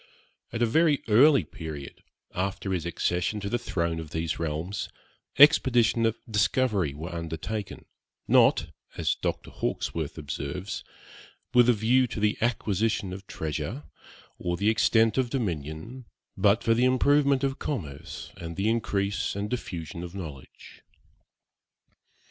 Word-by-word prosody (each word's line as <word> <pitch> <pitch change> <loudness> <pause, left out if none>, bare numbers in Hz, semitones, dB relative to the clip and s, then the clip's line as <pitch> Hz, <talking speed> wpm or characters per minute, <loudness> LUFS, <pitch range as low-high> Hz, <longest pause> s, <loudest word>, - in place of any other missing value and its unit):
At 115 - 0
a - - +5
very 150 +4 +3
early 135 +6 +6
period, 75 -4 -8 0.3
after 95 +1 -2
his 85 -2 -2
accession 90 +4 -1
to 100 - -3
the 120 - 0
throne 85 -8 -2
of 80 -2 -7
these 80 0 -2
realms, 80 +5 -3 0.5
expeditions 125 -5 +5
of 115 - 0
discovery 105 - +1
were 85 +4 -6
undertaken, 85 +5 -5 0.4
'not - - +4 0.3
(as - - +1
Dr. - - -4
Hawkesworth 80 -2 -3
observes) 80 +5 -5 0.7
with 125 -1 +6
a - - +7
view 120 +4 +3
to 115 - -5
the 105 0 +2
acquisition 110 -4 0
of 95 +1 -9
treasure, 80 - -4 0.6
or 85 0 -2
the 105 +4 +3
extent 115 +1 +3
of 125 -2 +1
dominion, 100 - -4 0.3
but 100 +3 +3
for 115 - +4
the 120 +2 +3
improvement 140 +1 +3
of 135 -1 -1
commerce, 80 - -5
and 85 0 -7
the 100 +3 +1
increase 100 -4 -1
and 100 +1 -3
diffusion 85 -9 -5
of 90 +1 -7
knowledge.' 75 -8 -10
100 Hz, 135 wpm, -27 LUFS, 85-120 Hz, 0.7 s, a